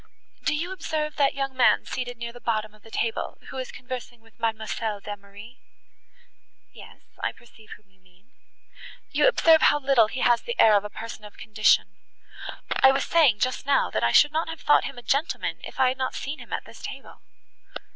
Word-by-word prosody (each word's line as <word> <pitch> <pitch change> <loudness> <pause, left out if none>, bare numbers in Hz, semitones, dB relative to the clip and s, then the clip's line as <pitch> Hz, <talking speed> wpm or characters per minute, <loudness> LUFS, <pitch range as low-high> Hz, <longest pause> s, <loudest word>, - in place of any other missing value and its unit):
Do 310 - +2
you 340 +5 -3
observe 310 -5 -3
that 280 -2 +2
young 270 -1 -3
man 255 - +4
seated 245 -1 -5
near 235 0 -6
the 245 - -13
bottom 215 -2 -2
of 215 - -21
the 225 - -16
table, 225 0 -2
who 265 - -7
is 255 - -5
conversing 250 -2 -8
with 225 +1 -25
Mademoiselle 220 -1 -2
d'Emery?" 205 +4 -10 1.1
"Yes, - - -14 0.2
I - - 0
perceive 220 -2 -16
whom 210 - -33
you 190 - -31
mean." 185 +5 -27 0.8
"You - - +3
observe 325 -10 +5
how 295 - +5
little 265 -5 +4
he 260 +4 -5
has 240 -1 +4
the 475 +1 -6
air 215 -1 +7
of 200 - +3
a - - -5
person 225 0 -8
of 210 - -13
condition; 215 -1 +2 0.8
I 265 - +8
was 270 - 0
saying 285 -11 +3
just 255 +2 -1
now, 280 - +2
that - - -1
I 115 - +3
should 295 - +6
not 320 +1 -1
have 325 -1 -7
thought 295 - +4
him 275 - -7
a 245 - -10
gentleman, 285 +7 -1
if - - -9
I 260 -1 +5
had 260 +1 -4
not 260 - -2
seen 290 +3 -5
him - - -13
at - - -3
this - - -14
table." - - -9
245 Hz, 205 wpm, -25 LUFS, 220-275 Hz, 1.1 s, I